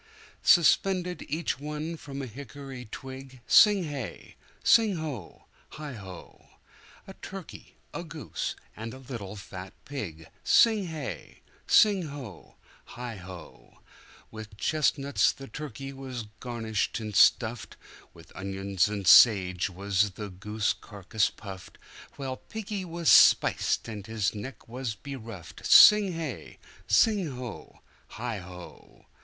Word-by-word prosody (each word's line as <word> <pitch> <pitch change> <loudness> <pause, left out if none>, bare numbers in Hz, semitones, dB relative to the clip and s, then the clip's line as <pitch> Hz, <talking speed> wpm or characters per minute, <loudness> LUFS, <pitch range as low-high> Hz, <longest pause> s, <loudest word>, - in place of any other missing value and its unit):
Suspended 180 +1 +3
each 155 -2 -2
one 150 +3 -4
from 140 -3 -7
a - - -3
hickory 135 +1 -9
twig 130 +3 -9
Sing 205 -4 +6
hey! 135 - -7 0.3
sing 220 -4 +5
ho! 145 - -6 0.3
heigho!A 120 - -12
turkey, 195 -2 -10 0.2
a - - -5
goose, 160 -2 -5 0.2
and 115 +2 -7
a - - -10
little 120 -7 -7
fat 95 -2 -9
pig 85 - -6 0.2
Sing 220 -4 +4
hey! 155 -4 -7 0.2
sing 200 -6 +5
ho! 135 - -10 0.4
heigho! 95 - -9 0.5
With 110 -2 -10
chestnuts 140 +2 +1
the 135 - -11
turkey 140 -2 -7
was 130 -4 -6
garnished 115 -4 -2
and 110 -1 -6
stuffedWith 110 +2 0
onions 95 0 -1
and 100 -2 -4
sage 95 -3 +6
was 100 +2 0
the 100 +1 -8
goose 105 +4 -1
carcass 100 0 -2
puffed, 95 -3 -11 0.4
While 130 -2 -5
piggy 210 -2 -6
was 170 -1 -5
spiced, - - +5
and 105 -2 -7
his 110 -3 -1
neck 115 +3 -8
was 120 -1 -4
beruffed 115 - -9
Sing 210 -3 +8
hey! 160 -8 -6 0.3
sing 180 - +3
ho! 125 -3 -9 0.3
heigho! 90 -7 -8
125 Hz, 115 wpm, -28 LUFS, 105-150 Hz, 0.5 s, Sing